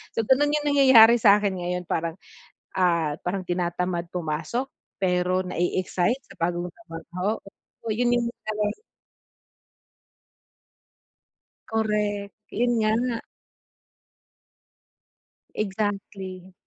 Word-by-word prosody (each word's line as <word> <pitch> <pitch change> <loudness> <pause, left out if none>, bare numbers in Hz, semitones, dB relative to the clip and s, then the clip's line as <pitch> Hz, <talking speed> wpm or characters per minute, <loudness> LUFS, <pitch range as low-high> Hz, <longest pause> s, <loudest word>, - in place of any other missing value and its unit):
So, - - -1
ganun 290 +3 +4
yung 295 -1 0
nangyayari 260 -5 +8
sa 205 -1 +6
akin 200 -2 -1
ngayon 180 0 -2
parang, 165 0 -1 0.6
ah, 170 -5 +2
parang 185 +1 -1
tinatamad 175 0 -1
pumasok, 170 - -2 0.3
pero 180 0 +2
na-e-excite 180 +7 0
sa - - -14
bagong 175 +1 -1
trabaho, 180 +1 -4 0.5
'yun 240 +2 +1
'yung 235 -1 +1 0.2
talagang 210 -1 -1 3.0
Correct, 210 -2 -1 0.2
'yun 240 +2 +1
nga. 230 +2 +1 2.3
Exactly. 195 -2 -4
195 Hz, 85 wpm, -25 LUFS, 180-225 Hz, 3.0 s, nangyayari